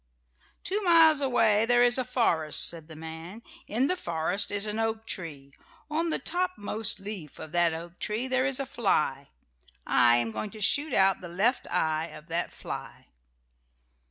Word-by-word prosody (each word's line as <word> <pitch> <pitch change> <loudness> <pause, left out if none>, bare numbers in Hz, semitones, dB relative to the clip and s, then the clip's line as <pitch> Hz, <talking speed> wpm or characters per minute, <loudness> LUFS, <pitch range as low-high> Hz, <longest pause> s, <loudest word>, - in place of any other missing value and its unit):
"Two 405 +3 -1
miles 325 -5 +5
away 225 -5 +2
there 245 0 +4
is 245 +1 +3
a - - 0
forest," 225 - +2
said 165 -2 -2
the 160 - -11
man. 160 +7 -9 0.2
"In 240 +5 0
the 365 - +1
forest 170 - -2
is 205 0 +1
an 215 +1 -2
oak 225 0 -2
tree. 145 -9 -7 0.4
On 330 +2 -1
the - - 0
top 360 +2 -1
most 210 0 +2
leaf 195 -6 -8
of 155 - -9
that 175 -1 +2
oak 170 +2 -8
tree 220 +5 -2
there 260 +1 +1
is 275 -1 +1
a 275 - -2
fly. 150 - -1 0.6
I 120 -1 +4
am 120 -1 0
going 210 - -4
to - - -9
shoot 285 +8 +2
out 190 -1 +3
the 180 - -8
left 210 +9 0
eye 160 0 -1
of 155 0 -13
that 170 +1 -1
fly." - - -9
205 Hz, 180 wpm, -27 LUFS, 165-250 Hz, 0.6 s, miles